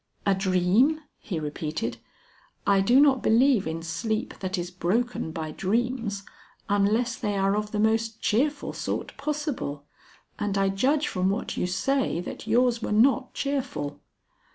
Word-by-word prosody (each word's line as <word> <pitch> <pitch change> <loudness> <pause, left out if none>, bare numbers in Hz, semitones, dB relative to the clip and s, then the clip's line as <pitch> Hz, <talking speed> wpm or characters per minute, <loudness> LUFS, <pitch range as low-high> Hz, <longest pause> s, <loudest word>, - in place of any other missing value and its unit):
"A 200 - +4
dream!" 190 - +2 0.2
he 175 -6 -4
repeated. 150 -5 -3 0.7
"I 200 -1 +4
do 240 +7 +5
not 275 -3 +5
believe 235 - +4
in 165 +1 -4
sleep 215 +7 -2
that 185 -1 -2
is 175 0 -4
broken 185 +2 -1
by 160 -1 -4
dreams, 215 +2 -1 0.4
unless 215 +4 +2
they 205 -4 -2
are 195 +1 +2
of 210 0 -2
the 210 - -3
most 220 +1 +1
cheerful 280 +6 0
sort - - -4
possible. 290 - -3 0.5
And 205 -2 -1
I 195 0 +2
judge 275 +10 +1
from 185 +1 0
what 200 - -2
you - - -1
say 245 +3 0
that 180 - -7
yours 240 +1 +3
were - - -3
not 255 +5 +3
cheerful." 275 - -3
210 Hz, 150 wpm, -26 LUFS, 185-250 Hz, 0.7 s, do